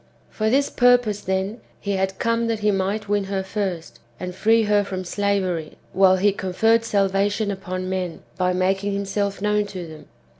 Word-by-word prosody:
For 215 0 0
this 275 +4 +2
purpose, 245 -4 +3
then, 190 +4 -2 0.2
he 200 - -3
had 190 -1 -1
come 230 0 0
that 225 -2 -1
he 210 0 +3
might 200 +2 -1
win 205 -1 +1
her 195 0 -2
first, 190 -4 -4 0.2
and 180 0 -5
free 225 +4 +3
her 205 -1 +3
from 190 -2 -5
slavery, 185 -4 -1 0.2
while 190 0 +5
he 200 +2 +3
conferred 215 +4 +2
salvation 200 0 +1
upon 185 -1 -4
men, 185 -2 -3
by 180 -1 +1
making 195 +2 0
himself 200 0 -2
known 210 0 +1
to 185 -3 -6
them. 155 -2 -12
200 Hz, 175 wpm, -23 LUFS, 185-210 Hz, 0.2 s, while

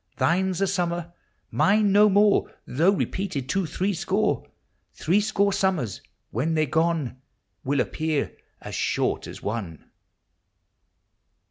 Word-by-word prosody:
Thine's 185 +1 +1
a - - +4
summer; 175 -2 -2 0.4
mine 205 0 +3
no 210 +2 +6
more, 205 +1 +3
Though 160 +9 +2
repeated 190 -8 -1
to 195 -3 0
threescore! 185 +3 -1 0.5
Threescore 200 +2 +1
summers, 190 - 0 0.3
when 155 +9 0
they 155 0 +2
're 135 - -13
gone, 160 -6 0 0.4
Will 140 +1 0
appear 155 0 -2 0.3
as - - -8
short - - -1
as - - -10
one! 100 -7 -5
175 Hz, 115 wpm, -25 LUFS, 150-195 Hz, 0.5 s, no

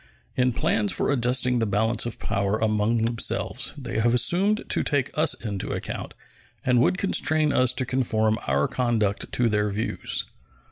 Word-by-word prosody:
In 125 0 +2
plans 115 -4 0
for - - -1
adjusting 125 -1 +1
the 115 - 0
balance 110 +3 0
of 120 - -5
power 100 -1 -1
among 110 +1 +1
themselves 115 0 0
they - - -4
have 120 +2 +2
assumed 195 - +3
to - - +1
take 140 -3 -1
us 155 +1 +2
into 100 -4 -5
account, - - -6 0.5
and 125 -2 +3
would 185 - +2
constrain 155 -6 +1
us 130 -1 +3
to 130 - 0
conform 110 -4 0
our 70 +2 +1
conduct 115 -5 -1
to 120 - +2
their 105 -1 0
views. 105 +2 -1
115 Hz, 160 wpm, -24 LUFS, 110-130 Hz, 0.5 s, assumed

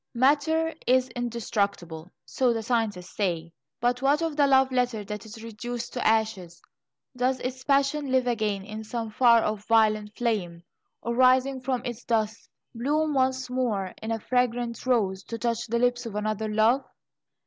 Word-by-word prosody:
"Matter 300 +6 +2
is 255 0 +3
indestructible," 200 -8 -3
so 250 -2 +1
the 225 -1 -3
scientists 215 -6 -2
say, 170 -5 -2 0.3
but 245 +1 0
what 285 +4 +2
of 325 -2 -2
the 285 -1 +4
love 265 -1 +4
letter 245 -4 0
that 210 +1 -7
is 220 +1 -10
reduced 230 +2 -6
to 245 - -2
ashes? 215 -6 0 0.6
Does 255 +1 0
its 255 +1 -4
passion 280 0 +1
live 260 -1 +3
again 215 -5 -1
in 215 +1 -7
some 225 0 -4
far 235 0 +5
off 215 -1 -3
violet 215 -2 +2
flame, 185 -8 -2 0.4
or, 235 - -1
rising 255 +1 +3
from 255 -1 -2
its 240 -1 -5
dust, 220 -1 -1 0.2
bloom 295 +6 0
once 260 -1 +1
more 235 -7 -1
in 220 - -5
a 225 - -1
fragrant 245 0 -1
rose, 200 -7 +1
to 230 - -5
touch 235 0 -2
the 235 +1 0
lips 245 0 +1
of 210 - -7
another 215 +1 -2
love? 220 +5 +3
235 Hz, 165 wpm, -26 LUFS, 215-255 Hz, 0.6 s, far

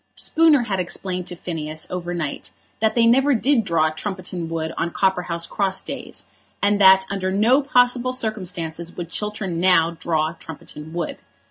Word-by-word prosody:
Spooner 315 -5 +4
had 200 -5 -2
explained 180 0 -3
to 175 - -6
Phineas 155 -3 -5
over 175 -1 -4
night 155 - -4 0.3
that 220 0 +1
they 235 -1 +4
never 265 +4 +4
did 245 +1 +3
draw 165 -4 +1
Trumpeton 180 -1 -5
Wood 160 -1 -3
on 170 - -1
Copperhouse 180 -2 0
Cross 195 -2 -1
days, - - -7 0.3
and 205 0 +2
that 190 0 +7
under 190 -1 -1
no 225 +8 +4
possible 250 -2 +2
circumstances 180 -8 -4
would 170 -2 -5
Chiltern 210 -5 -3
now 170 -2 +4
draw 160 -2 -1
Trumpeton 155 -1 -10
Wood. 170 -1 -4
185 Hz, 155 wpm, -22 LUFS, 165-215 Hz, 0.3 s, that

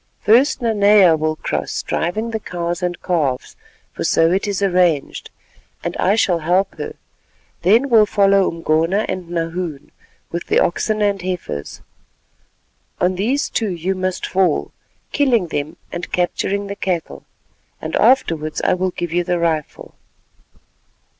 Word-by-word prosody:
First 245 +5 +3
Nanea 205 -5 +5
will 155 0 -1
cross - - -3
driving 215 +8 -2
the 220 - -2
cows 175 -2 -4
and 180 -1 -2
calves, 150 -8 -1 0.4
for - - -4
so 165 +1 +3
it 195 +3 0
is 200 -1 -1
arranged, 180 -6 +1 0.5
and - - -3
I 195 +3 +2
shall 180 -6 +2
help 180 +5 +1
her; - - -5 0.7
then 220 +10 +4
will 225 -5 +5
follow 195 -2 +3
Umgona 165 +5 0
and 185 -2 -5
Nahoon 165 -3 -4 0.4
with 170 0 -4
the - - +2
oxen 215 +4 +1
and 200 -2 +1
heifers. 180 - -5 1.2
On 180 +1 +2
these 230 +10 0
two 220 -3 -1
you 180 +1 -2
must 185 -1 -2
fall, 185 -5 +1 0.4
killing 240 - +2
them 155 +3 -4
and 175 - -6
capturing 195 +3 -1
the 200 0 -5
cattle, 180 -4 -3 0.6
and - - -4
afterwards 165 - +2
I - - +3
will 185 +1 0
give 175 -2 -5
you 175 0 +1
the 175 0 0
rifle." 160 -3 -2
180 Hz, 140 wpm, -19 LUFS, 170-200 Hz, 1.2 s, Nanea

